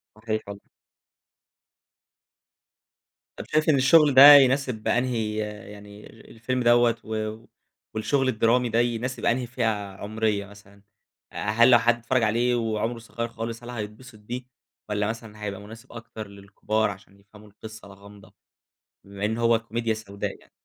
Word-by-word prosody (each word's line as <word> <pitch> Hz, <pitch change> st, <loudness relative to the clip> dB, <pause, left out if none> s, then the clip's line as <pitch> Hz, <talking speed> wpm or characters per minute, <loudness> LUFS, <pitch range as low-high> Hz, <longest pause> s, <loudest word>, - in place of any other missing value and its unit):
صحيح 110 Hz, 0 st, -3 dB
والله. 100 Hz, 0 st, -9 dB, 2.8 s
طب -, -, -7 dB
شايف 155 Hz, +1 st, +1 dB
إن 150 Hz, -, +5 dB
الشغل 145 Hz, +2 st, +5 dB
ده 140 Hz, +3 st, +11 dB
يناسب 130 Hz, -4 st, +2 dB
أنهي 115 Hz, -4 st, -1 dB, 0.3 s
يعني 105 Hz, 0 st, -13 dB, 0.2 s
الفيلم 125 Hz, +2 st, -3 dB
دوّة 120 Hz, -1 st, +4 dB
و 110 Hz, 0 st, -5 dB, 0.5 s
والشغل 135 Hz, +5 st, 0 dB
الدرامي 120 Hz, +2 st, +1 dB
ده 115 Hz, +1 st, +1 dB
يناسب 120 Hz, +1 st, -2 dB
أنهي 120 Hz, +1 st, 0 dB
فئة 120 Hz, 0 st, -3 dB, 0.3 s
عُمرية 105 Hz, -1 st, -2 dB
مثلًا؟ 100 Hz, 0 st, -18 dB, 0.5 s
أ -, -, -16 dB
هل 120 Hz, +3 st, +5 dB
لو 120 Hz, -, +7 dB
حد 120 Hz, 0 st, +2 dB
اتفرّج 120 Hz, +1 st, -1 dB
عليه 120 Hz, +3 st, +1 dB
وعُمره 115 Hz, 0 st, -2 dB
صغير 115 Hz, 0 st, -5 dB
خالص، 115 Hz, +1 st, -7 dB
هل 120 Hz, -, -9 dB
هيتبسط 110 Hz, +1 st, -8 dB
بيه 120 Hz, +4 st, -7 dB, 0.5 s
والّا 105 Hz, 0 st, -1 dB
مثلًا 110 Hz, -2 st, -8 dB
هيبقى 100 Hz, -1 st, -5 dB
مناسب 110 Hz, +2 st, -13 dB
أكتر 115 Hz, -2 st, -9 dB
للكبار 100 Hz, +2 st, -3 dB
عشان 100 Hz, 0 st, -12 dB
يفهموا 105 Hz, +1 st, -18 dB
القصة 110 Hz, +1 st, -12 dB
الغامضة، 100 Hz, 0 st, -16 dB, 0.7 s
بما 100 Hz, +1 st, -7 dB
إن 110 Hz, +2 st, -1 dB
هو 115 Hz, -1 st, +3 dB
كوميديا 115 Hz, 0 st, -3 dB
سوداء 100 Hz, -2 st, -7 dB
يعني؟ -, -, -24 dB
115 Hz, 140 wpm, -25 LUFS, 105-120 Hz, 2.8 s, ده